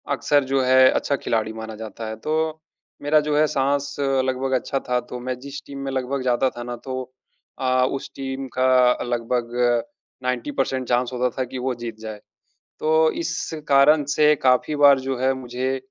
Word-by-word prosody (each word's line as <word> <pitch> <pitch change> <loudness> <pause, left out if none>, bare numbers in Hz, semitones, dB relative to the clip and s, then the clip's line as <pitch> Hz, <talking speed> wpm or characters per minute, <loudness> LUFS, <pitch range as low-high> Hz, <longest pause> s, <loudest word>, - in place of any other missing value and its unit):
अक्सर 145 -1 +2
जो 135 -1 +3
है 130 0 +6
अच्छा 140 - 0
खिलाड़ी 110 -4 -1
माना 110 0 -7
जाता 110 +1 -7
है। 110 - -4
तो 155 - 0 0.7
मेरा 150 +1 +4
जो 150 -1 +1
है 155 - +5
साँस 140 +1 0
लगभग 135 -1 0
अच्छा 135 - -3
था 125 0 +2
तो 125 - -5
मैं 125 +1 -4
जिस 140 +2 -8
टीम 140 -1 -8
में 135 - -3
लगभग 130 +1 -2
जाता 130 +1 +2
था 120 - -5
ना 120 0 -5
तो 130 -1 -3 0.6
अ, 130 -1 +2
उस 135 +1 -4
टीम 135 0 -5
का 130 -1 +4
लगभग 120 0 -2 0.7
90 125 +2 -2
परसेंट 130 -1 -2
चांस 125 +1 +1
होता 125 0 +1
था - - +2
कि 130 +1 -7
वो 130 +1 -1
जीत 115 -2 -5
जाए। 110 -1 -7 0.6
तो 160 0 +3
इस 165 -1 -2 0.3
कारण 145 +2 +5
से 150 0 +5
काफ़ी 130 +4 +3
बार 140 -2 +6
जो 130 -1 -3
है 130 +1 +2
मुझे 130 +1 -3
130 Hz, 185 wpm, -23 LUFS, 125-140 Hz, 0.7 s, है